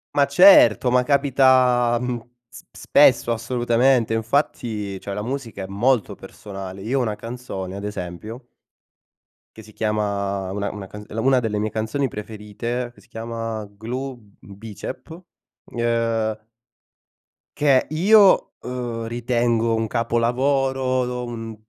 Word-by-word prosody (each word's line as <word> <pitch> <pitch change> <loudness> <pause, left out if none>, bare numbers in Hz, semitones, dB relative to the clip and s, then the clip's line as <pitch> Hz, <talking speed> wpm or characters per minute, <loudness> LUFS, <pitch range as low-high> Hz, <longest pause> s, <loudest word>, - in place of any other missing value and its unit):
Ma 140 -1 +4
certo, 140 - +6
ma 125 0 +4
capita, 130 -3 +3
mhmm, 125 -2 -3 0.3
sp - - -14
spesso 125 -4 +4
assolutamente. 120 +1 +1
Infatti 110 -4 -1
cioè 100 - -6
la 105 - -4
musica 120 -6 -5
è - - -4
molto 110 +5 0
personale. 95 -2 -9
Io 130 +5 0
ho - - +1
una 110 -3 -1
canzone 115 -6 -7
ad 100 - -7
esempio 105 +5 -7 1.1
che - - -10
si 110 0 -15
chiama 100 -3 -2
una 100 0 -3
una 100 -2 -8
ca 105 - -10 0.2
una 130 +1 +3
delle 110 -3 -2
mie 110 +1 -1
canzoni 110 +6 -2
preferite, 110 +3 -5
che - - -22
si - - -24
chiama 115 -1 -5
Glue 125 +5 -6 0.2
Bicep, 105 - -9 0.6
uhm 115 -2 -1 1.1
che 140 -3 +3
io, 195 +5 +5
uhm, 120 -2 -5
ritengo 115 -1 0
un 110 0 -1
capolavoro, 125 +2 0
un 115 -2 -6
115 Hz, 125 wpm, -22 LUFS, 105-125 Hz, 1.1 s, certo